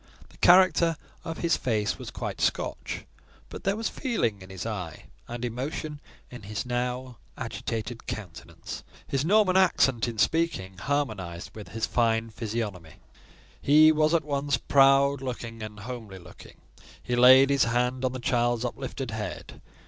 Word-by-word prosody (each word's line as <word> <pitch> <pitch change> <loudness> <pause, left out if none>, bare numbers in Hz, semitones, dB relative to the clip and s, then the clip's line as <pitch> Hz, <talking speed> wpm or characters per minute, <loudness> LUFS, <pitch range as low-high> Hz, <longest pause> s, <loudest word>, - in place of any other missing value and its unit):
The - - -20
character 170 -3 +5 0.3
of 165 -1 -5
his 170 -1 +2
face 110 -4 -1
was - - -7
quite - - -5
Scotch; - - -2 0.4
but - - -9
there 195 +1 +2
was 225 +1 -2
feeling 165 - -1
in 95 - -12
his 95 0 -6
eye, 95 -8 -5 0.2
and 120 +1 -4
emotion 145 +5 -4 0.3
in 125 - -9
his 105 +2 -5
now 125 0 -3 0.2
agitated 115 +1 -5
countenance. 95 -6 -7 0.2
His 135 0 0
northern 190 +1 +4
accent 135 -11 +3
in 115 -2 -5
speaking 105 - 0
harmonised 100 -10 -3
with 105 -2 -9
his 110 +1 -2
physiognomy. 110 -6 -2 0.7
He 155 +2 +7
was 155 +1 +3
at 160 - +1
once 140 -1 0
proud 135 0 +4
looking 115 -3 -6
and 105 -1 -7
homely 110 -4 -7
looking. 85 - -14 0.5
He 125 - -1
laid 130 +3 +7
his 140 -3 +4
hand 125 +2 0
on 130 - +1
the 130 - -5
child's 120 0 +1
uplifted 130 0 -5
head. 105 -6 -6
125 Hz, 150 wpm, -27 LUFS, 110-140 Hz, 0.7 s, He